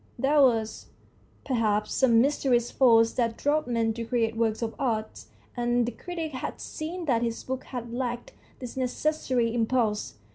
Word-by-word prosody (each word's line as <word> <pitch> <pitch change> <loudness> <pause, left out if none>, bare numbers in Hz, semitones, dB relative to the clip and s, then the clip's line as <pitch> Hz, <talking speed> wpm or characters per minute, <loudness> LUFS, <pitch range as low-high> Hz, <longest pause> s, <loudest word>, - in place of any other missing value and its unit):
There 280 +4 +3
was, 225 -4 +2 0.6
perhaps, 215 -5 0
some 235 -4 +4
mysterious 255 -3 +1
force 230 -3 +5
that 230 -2 0
drove 300 +1 +1
men 230 -2 0
to 230 +1 -5
create 230 -1 0
works 225 0 0
of 225 0 -3
art, 220 -5 -2 0.3
and 240 0 +1
the 240 - -2
critic 335 0 -5
had 260 -2 -5
seen 335 +3 -5
that 240 -6 +2
his 230 -1 -2
book 260 0 -4
had 240 -2 -6
lacked 245 -1 -3 0.2
this 250 -2 -8
necessary 255 -2 0
impulse. 225 - 0
240 Hz, 155 wpm, -27 LUFS, 230-265 Hz, 0.6 s, force